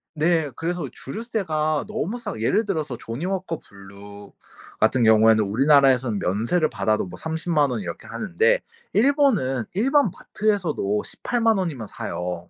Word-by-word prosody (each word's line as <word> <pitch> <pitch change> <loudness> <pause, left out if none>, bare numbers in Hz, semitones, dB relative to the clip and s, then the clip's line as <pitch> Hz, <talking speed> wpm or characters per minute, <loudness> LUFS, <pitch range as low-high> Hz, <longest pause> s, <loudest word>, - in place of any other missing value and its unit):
네. 160 -1 +1
그래서 170 -2 -3
주류세가 155 - -2
너무 215 +1 -3
싸 235 -3 -5
예를 205 - +1
들어서 155 - -3
조니워커 170 +7 -4
블루 100 +1 -13 0.5
같은 120 +2 +3
경우에는 110 0 +5
우리나라에선 130 0 +3
면세를 120 - 0
받아도 110 -2 0
뭐 90 0 -10
300,000 160 -2 0
원 115 -4 -3
이렇게 85 -2 -7
하는데 460 - +1 0.3
일본은 215 - +2
일반 270 +4 +3
마트에서도 170 - -1
180,000 230 -3 0
원이면 145 - -3
사요. 90 -3 -5
150 Hz, 305 characters per minute, -23 LUFS, -, 0.5 s, 경우에는